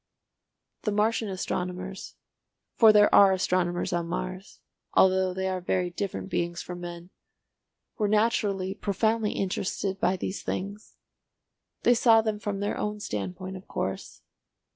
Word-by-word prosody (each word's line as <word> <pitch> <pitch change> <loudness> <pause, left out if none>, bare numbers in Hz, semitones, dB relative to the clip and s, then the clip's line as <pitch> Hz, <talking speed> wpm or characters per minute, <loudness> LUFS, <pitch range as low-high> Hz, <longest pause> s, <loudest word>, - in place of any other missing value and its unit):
The 210 - -1
Martian 215 +1 +1
astronomers—for 185 +4 -1
there 210 0 +5
are 195 -1 +7
astronomers 180 -1 0
on 170 -1 -1
Mars, 185 +2 -5 0.4
although 190 0 +4
they 190 +1 -2
are 185 -1 -2
very 180 0 -1
different 195 +2 -4
beings 170 -2 -2
from 180 0 -7
men—were 175 +4 -9
naturally 205 -3 +1
profoundly 220 +2 0
interested 190 0 -2
by 185 +1 +1
these 190 +2 -4
things. 200 +3 -5 0.9
They 245 - +6
saw 230 -1 +5
them 215 -1 -2
from 205 -1 -3
their 205 - -2
own 210 0 -2
standpoint 185 - -5
of 185 - -14
course. 95 0 -4
190 Hz, 125 wpm, -27 LUFS, 180-210 Hz, 0.9 s, are